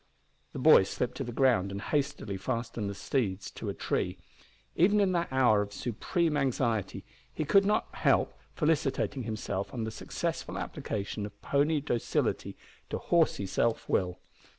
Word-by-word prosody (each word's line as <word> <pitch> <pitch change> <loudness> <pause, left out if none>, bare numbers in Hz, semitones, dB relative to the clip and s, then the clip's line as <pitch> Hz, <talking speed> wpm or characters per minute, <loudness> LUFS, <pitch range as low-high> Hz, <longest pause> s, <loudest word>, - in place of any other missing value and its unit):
The - - -6
boy - - +7
slipped - - -2
to - - -2
the 120 - -5
ground 115 -7 +3
and 100 - -4
hastily 140 -6 -2
fastened 115 0 -3
the 100 - -5
steeds 100 -6 -2
to - - -5
a - - -2
tree. - - -1 0.6
Even 205 +5 +4
in 195 -2 +3
that 170 -4 0
hour 125 -6 +4
of 100 0 -4
supreme 150 - -1
anxiety 120 -6 0 0.3
he 155 - -3
could 195 +6 +5
not 210 - +1
help - - +2 0.2
felicitating 150 -4 +1
himself 110 -3 -3
on 120 -3 -3
the 110 - -3
successful 110 - -4
application 105 0 -4
of 105 0 -16
pony 145 +2 +2
docility 120 -5 -1 0.3
to - - -2
horsey 165 - +2
self 115 +4 0
will. 90 -1 0
120 Hz, 155 wpm, -30 LUFS, 105-150 Hz, 0.6 s, boy